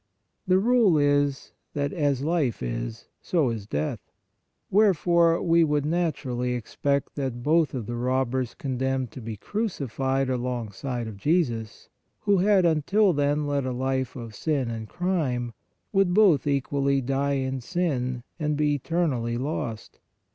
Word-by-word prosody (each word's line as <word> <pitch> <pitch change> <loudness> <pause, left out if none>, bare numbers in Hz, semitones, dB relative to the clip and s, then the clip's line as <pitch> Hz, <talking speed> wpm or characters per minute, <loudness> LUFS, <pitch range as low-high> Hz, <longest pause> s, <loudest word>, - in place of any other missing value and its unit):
The 185 0 +5
rule 220 -4 +4
is 145 -1 +1 0.2
that 140 -1 -1
"as 145 -4 0
life 150 - 0
is, - - -4
so 155 -9 +1
is 110 -3 -6
death." 75 -5 -2 0.7
Wherefore 170 -4 +4
we 170 -1 +4
would 150 -2 +1
naturally 135 -7 -1
expect 140 +4 -1
that 130 -4 -3
both 155 -1 +2
of 120 -4 -3
the 120 - -4
robbers 130 0 -1
condemned 130 -2 -2
to 130 - -9
be 110 -1 -6
crucified 135 - -2
alongside 125 -1 -3
of 110 -3 -8
Jesus, 120 - -1 0.3
who 200 -2 +3
had 195 -1 +4
until 175 +5 +3
then 145 0 +1
led 145 -1 0
a - - -1
life 130 0 -1
of 115 -4 -7
sin 135 -1 -1
and 110 -1 -6
crime, 140 -10 -1 0.4
would 195 -2 +3
both 180 - +5
equally 140 0 +1
die 135 +2 0
in 130 -1 -2
sin 130 -6 -1 0.2
and 150 -1 0
be 150 -1 +2
eternally 140 -6 -1
lost. 120 -5 -4
140 Hz, 140 wpm, -26 LUFS, 125-165 Hz, 0.7 s, The